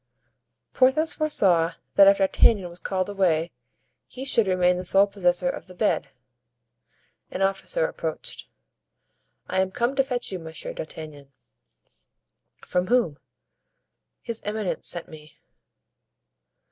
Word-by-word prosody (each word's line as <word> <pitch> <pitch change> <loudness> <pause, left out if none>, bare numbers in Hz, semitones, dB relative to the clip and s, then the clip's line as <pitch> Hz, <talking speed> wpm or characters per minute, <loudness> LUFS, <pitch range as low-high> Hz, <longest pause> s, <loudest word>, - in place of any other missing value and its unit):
Porthos 270 +5 +3
foresaw 185 - +2 0.2
that 195 - +7
if 200 0 +6
D'Artagnan 195 -1 +3
was 175 - -8
called 185 -1 -2
away 175 -5 +1 0.6
he 260 +1 -8
should 230 -6 +2
remain 180 -1 +2
the 180 - -4
sole 195 +2 +4
possessor 180 -3 0
of - - -4
the 180 - -13
bed. - - 0 1.2
An 195 - -2
officer 195 - 0
approached. - - -4 1.0
"I 190 - +1
am 190 - 0
come 240 +7 -1
to 270 - +3
fetch 250 -4 -3
you, 185 - -4
Monsieur 165 - -7
d'Artagnan." 155 - -9 1.3
"From 180 0 -1
whom?" 230 - +1 1.0
"His 230 -1 -5
eminence 210 -2 -2
sent 175 - -1
me." 155 -1 -14
190 Hz, 120 wpm, -25 LUFS, 175-235 Hz, 1.3 s, that